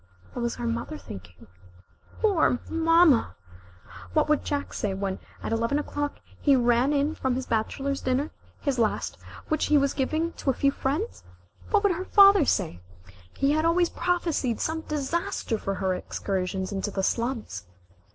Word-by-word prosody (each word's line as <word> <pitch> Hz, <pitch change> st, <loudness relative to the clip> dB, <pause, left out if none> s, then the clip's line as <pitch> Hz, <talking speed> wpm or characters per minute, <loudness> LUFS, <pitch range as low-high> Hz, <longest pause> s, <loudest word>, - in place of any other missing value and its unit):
What 245 Hz, -, -4 dB
was 235 Hz, 0 st, -1 dB
her 240 Hz, -, -5 dB
mother 235 Hz, +6 st, -3 dB
thinking? 90 Hz, -, -11 dB, 0.8 s
Poor 375 Hz, -, +3 dB
mama! 330 Hz, -5 st, +4 dB, 0.8 s
What -, -, +3 dB
would 300 Hz, -, +2 dB
Jack 285 Hz, -1 st, -3 dB
say, 200 Hz, -2 st, -2 dB
when, 195 Hz, -1 st, -3 dB, 0.2 s
at -, -, -3 dB
eleven 230 Hz, +5 st, +1 dB
o'clock, 290 Hz, -1 st, -3 dB, 0.2 s
he 280 Hz, -2 st, +5 dB
ran 245 Hz, +2 st, +3 dB
in 290 Hz, +1 st, +1 dB
from 260 Hz, -4 st, -1 dB
his 260 Hz, 0 st, -3 dB
bachelor's 270 Hz, +5 st, -1 dB
dinner 260 Hz, +4 st, 0 dB, 0.3 s
his 275 Hz, -4 st, -1 dB
last 220 Hz, -2 st, 0 dB, 0.3 s
which 310 Hz, -1 st, +1 dB
he 300 Hz, -, +5 dB
was 280 Hz, -1 st, +2 dB
giving 315 Hz, +5 st, -1 dB
to -, -, 0 dB
a 260 Hz, -, +2 dB
few 275 Hz, -, +2 dB
friends? 295 Hz, -, -2 dB, 0.5 s
What 420 Hz, -1 st, +3 dB
would 405 Hz, -, +4 dB
her 365 Hz, +2 st, -3 dB
father 395 Hz, -5 st, +7 dB
say? 175 Hz, -, 0 dB, 0.6 s
He 275 Hz, +1 st, +2 dB
had 310 Hz, +1 st, +2 dB
always 340 Hz, +1 st, +3 dB
prophesied 330 Hz, -10 st, -1 dB
some 320 Hz, 0 st, -1 dB
disaster 300 Hz, -6 st, -2 dB
for 195 Hz, -, -2 dB
her 190 Hz, -1 st, 0 dB
excursions 190 Hz, 0 st, -3 dB
into 200 Hz, +1 st, -2 dB
the 195 Hz, -1 st, -2 dB
slums. 235 Hz, -, -2 dB
275 Hz, 160 wpm, -26 LUFS, 230-315 Hz, 0.8 s, father